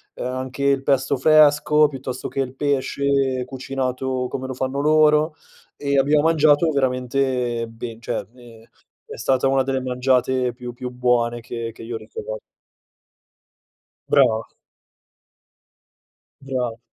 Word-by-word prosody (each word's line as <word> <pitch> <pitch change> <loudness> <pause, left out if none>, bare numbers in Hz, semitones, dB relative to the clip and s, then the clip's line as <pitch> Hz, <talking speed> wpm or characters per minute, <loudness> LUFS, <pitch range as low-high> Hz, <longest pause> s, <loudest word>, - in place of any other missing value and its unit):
ehm, - - -5
anche 130 +2 -4
il 140 -1 +3
pesto 135 0 +1
fresco, 150 +1 +5
piuttosto 130 -2 -6
che - - -5
il 135 -1 -2
pesce 140 -2 0
cucinato 130 0 -3
come 130 +1 -5
lo 130 - -5
fanno 130 +2 -2
loro 155 0 +4 0.4
e 140 -1 +1
abbiamo 145 +2 +3
mangiato 155 0 +4
veramente 125 -3 0
ben 115 0 -8
cioè, 115 - -3
ehm, 120 -3 -15 0.4
è - - -9
stata 130 0 +1
una 135 0 +3
delle 135 0 -1
mangiate 125 0 +1
più 120 0 -8
più 125 +1 -6
buone 120 -1 0
che 115 0 -5
che - - -12
io 115 +1 -5
ricor 110 0 -7 1.7
Brava. 110 0 +3 1.9
Bravo. 125 -4 -3
130 Hz, 125 wpm, -22 LUFS, 125-140 Hz, 1.9 s, fresco